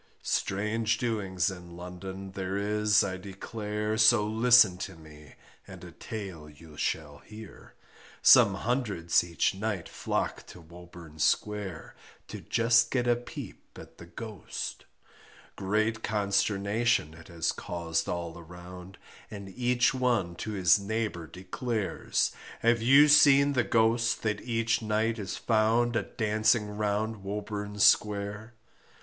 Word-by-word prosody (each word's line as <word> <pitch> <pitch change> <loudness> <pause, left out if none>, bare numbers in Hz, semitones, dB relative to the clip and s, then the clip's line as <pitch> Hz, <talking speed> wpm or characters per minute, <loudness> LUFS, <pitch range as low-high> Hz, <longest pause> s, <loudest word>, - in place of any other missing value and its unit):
Strange 105 +3 -1
doings 100 -7 -1
in 90 -2 -11
London 95 +2 -8
there 95 0 -4
is 105 0 +2
I 95 -2 -3
declare, 105 +3 -4
So 110 -1 +6
listen 110 -3 +5
to 95 -1 -6
me 75 -2 -15 0.3
and - - -11
a - - -10
tale 95 -8 -8
you 75 +1 -15
shall 75 -1 -3
hear, 110 -2 -13 0.5
Some 100 - +7
hundreds 105 -7 0
each 85 -1 0
night 100 -2 -4
flock - - -3
to - - -12
Woburn 85 -1 -14
Square, 100 -1 -1 0.3
To - - -7
just 115 0 +3
get 125 -2 -1
a 120 - +4
peep 120 +1 -10
at - - -14
the 85 - -11
Ghost 110 +2 -7 0.7
Great 110 +3 -1
consternation 100 -2 0
it 80 +1 -14
has 85 -1 -1
caused 85 -1 -3
all 85 -1 -4
around, 90 +2 -12 0.3
And 100 -2 -9
each 125 +4 +1
one 120 -9 0
to 110 - -5
his 95 -1 +4
neighbour 100 -5 -3
declares, 105 +5 -2 0.3
Have 115 0 +2
you 135 +5 +6
seen 145 -1 +6
the 125 -3 +2
Ghost 115 +2 +1
that 105 -2 -1
each 115 -1 0
night 110 +1 -1
is 95 -3 -5
found 115 +2 +1
A - - +2
dancing 110 -1 0
round 105 +1 -1
Woburn 105 0 -5
Square. 105 +2 +2
105 Hz, 130 wpm, -28 LUFS, 90-115 Hz, 0.7 s, Some